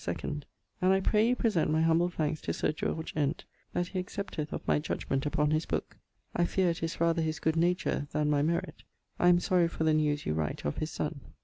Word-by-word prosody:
2ᵈ, 85 - -3
and 150 -1 -3 0.5
I 190 - +4
pray 210 +3 +3
you 250 - +3
present 210 -10 +1
my 160 +1 +2
humble 165 +2 +3
thanks 155 -3 -2
to - - -2
Sir - - 0
George 160 +1 -3
Ent 150 0 -1 0.3
that 175 0 -1
he 185 - -2
accepteth 180 -5 -4
of - - -5
my - - +3
judgment 135 -2 -2
upon 150 0 +1
his 155 +1 +1
booke. - - -3 0.4
I 175 - +3
fear 180 0 +2
it 165 - -5
is 165 0 -3
rather 165 0 +2
his 160 0 -1
good 160 0 +1
nature 170 -3 +1
then 150 -1 +1
my 145 -1 +3
merit. 170 +3 -1 0.4
I 175 - +4
am 175 0 +6
sorry 175 -1 +3
for 165 - -3
the 160 -1 +4
news 150 -1 +1
you 75 - 0
write 75 -1 -2
of 75 - -1
his 155 - -2
son. 150 -1 -3
160 Hz, 230 wpm, -30 LUFS, 150-175 Hz, 0.5 s, am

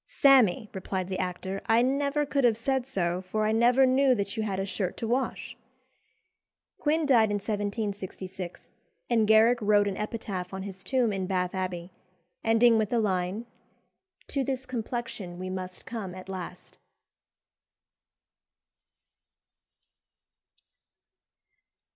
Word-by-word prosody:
"Sammy," 245 -7 +4
replied 190 -1 -3
the 185 - -3
actor, 190 +2 -3
"I 230 +1 +4
never 280 +3 +1
could 280 -1 0
have 230 -3 +4
said 260 +2 -1
so, 180 -7 -1
for 215 +3 -2
I 215 - +2
never 240 +4 +5
knew 260 0 +4
that 200 -1 -3
you 220 - -1
had 200 -3 -2
a 195 - -1
shirt 190 -2 -3
to 225 - -3
wash." 255 +3 -2 1.2
Quin 315 +1 +1
died 235 -6 +5
in 205 - 0
1766, 200 -3 -4 0.4
and 225 -3 +3
Garrick 225 +3 +5
wrote 205 -1 +4
an 195 - -3
epitaph 200 -4 -4
on 190 - -5
his 190 -1 -7
tomb 250 -5 +1
in 190 -1 -2
Bath 180 -1 -1
Abbey, 185 -1 -4 0.5
ending 225 0 +5
with 215 -2 0
the 240 - +1
line 190 +1 -1 0.8
"To 275 - 0
this 265 0 -3
complexion 230 -7 -5
we 185 +1 -5
must 185 -1 -6
come 200 -6 -5
at 185 0 -10
last." 180 -1 -8
210 Hz, 130 wpm, -28 LUFS, 190-240 Hz, 1.2 s, never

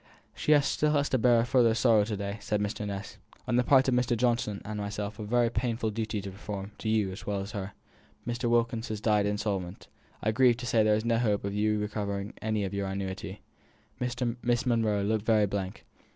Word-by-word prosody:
"She - - -1
has 145 -2 +2
had 150 -1 +3
to 130 - +2
bear 120 0 +5
a - - 0
still - - -14
further 115 -2 +4
sorrow 115 -3 +4
to 105 -1 -3
day," 100 +1 -4
said 105 +1 -1
Mr. 105 0 -3
Ness. 100 0 -6 0.3
"On 120 - +1
the 125 - +4
part 135 +1 +5
of 130 - +2
Mr. 125 -1 +1
Johnson 115 -4 0
and 105 0 -4
myself 105 +1 -4
I - - -4
have 105 - -5
a - - -10
very 120 -1 +3
painful 115 -1 -1
duty 110 -1 -3
to 95 0 -6
perform 100 +1 -6
to 110 - -2
you 105 -3 +1
as 95 - -9
well 100 -1 -1
as 100 +1 -6
to - - -5
her. 100 +1 -6 0.5
Mr. 120 0 -1
Wilkins 115 -1 +1
has 110 -2 -4
died 105 -1 +2
insolvent. 100 -3 -3 0.3
I 110 - +2
grieve 120 +1 +4
to 120 - -6
say 115 -2 +3
there 105 0 +4
is 110 +2 -2
no 115 -1 +2
hope 105 -4 +1
of 100 - -2
your 105 +1 +1
ever 105 - -1 0.3
receiving 100 +1 -5
any 110 -1 -1
of 95 0 -3
your 100 -1 -2
annuity!" 95 +1 -5 0.6
Miss 120 0 -1
Monro 110 -4 +1
looked 105 +1 0
very 110 -2 +4
blank. 95 -1 -4
110 Hz, 235 wpm, -29 LUFS, 100-120 Hz, 0.6 s, bear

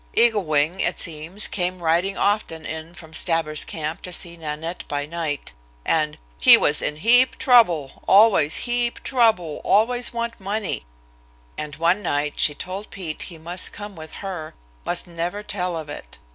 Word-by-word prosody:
Eagle 225 -4 +4
Wing, 155 +4 +1
it - - 0
seems, 165 +5 -2
came 180 -1 -2
riding 175 +3 +1
often 200 -6 0
in 160 +2 -7
from 160 -1 -12
Stabber's 160 -2 +1
camp 155 0 -5
to 180 - -8
see 175 -1 -4
Nanette 160 +1 -5
by 145 0 -2
night, 155 -2 -4 0.3
and 155 -2 +1 0.2
"he - - +9
was 150 - +1
in 150 - -2
heap 240 +10 +5
trouble, 175 - +3
always 195 -7 +5
heap 240 -1 0
trouble, 220 - +1
always 240 +4 +2
want 235 0 -4
money," 200 - -3 0.7
and 150 -1 -6
one 170 +5 +2
night 145 -5 -1
she 150 - +3
told 190 +6 -6
Pete 170 -6 -5
he 170 - -10
must 175 +3 -3
come 205 -1 -8
with 160 -1 -10
her, 175 -5 -6 0.3
must 175 - -2
never 175 +4 -4
tell 180 -4 -3
of 155 -2 -6
it. - - -10
170 Hz, 160 wpm, -23 LUFS, 155-205 Hz, 0.7 s, he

